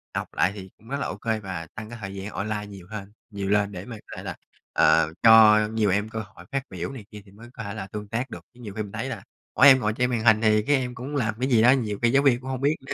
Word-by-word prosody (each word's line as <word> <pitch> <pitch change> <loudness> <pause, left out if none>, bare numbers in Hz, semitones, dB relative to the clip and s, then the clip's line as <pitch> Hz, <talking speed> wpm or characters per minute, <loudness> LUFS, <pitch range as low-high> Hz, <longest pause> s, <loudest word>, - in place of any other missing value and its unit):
học - - -2
lại 90 - +2
thì 95 -2 -9
cũng 110 - -21
rất 140 - -2
là 140 - -2
ô - - -5
kê 110 -1 -2
và 90 -5 -6
tăng 110 0 -7
cái 120 - -8
thời 100 -1 -6
gian 100 +1 -6
online 105 0 -3
nhiều 95 -3 -12
hơn 100 -2 -7 0.2
nhiều 100 -2 -4
lên 105 0 +2
để 90 -1 -7
mà 125 - -8
có - - -9
thể - - -7
là, - - -5 0.4
ờ, 80 -1 +4
cho 110 -1 +8
nhiều 110 -1 0
em 105 +3 0
cơ 110 - -5
hội 110 0 -11
phát 135 -1 -1
biểu 90 +2 -5
này 125 -6 -9
kia 105 -1 -10
thì 95 - -18
mới 115 +4 -14
có 115 - -7
thể 100 -1 -5
là 95 -3 -6
tương 105 +1 -7
tác 115 +5 -3
được. - - -8
Chứ 125 - -20
nhiều 105 -4 -8
khi 110 +1 -3
mình 100 - -10
thấy 115 +5 -4
là - - -6 0.3
mỗi 145 - +7
em 130 -2 +8
ngồi 105 -3 0
trên 125 +2 0
màn 120 -3 -1
hình 110 -1 +5
thì 110 -1 +4
các 145 - +4
em 125 -3 0
cũng 130 +4 -6
làm 110 -6 0
cái 130 +2 0
gì 120 -4 +4
đó, 120 +2 +7
nhiều 110 -6 0
khi 120 -1 +3
giáo 140 +2 +3
viên 130 -4 +4
cũng 130 - -7
hông 130 -1 -3
biết 145 +3 +2
nữa. - - -4
110 Hz, 320 wpm, -25 LUFS, 100-125 Hz, 0.4 s, cho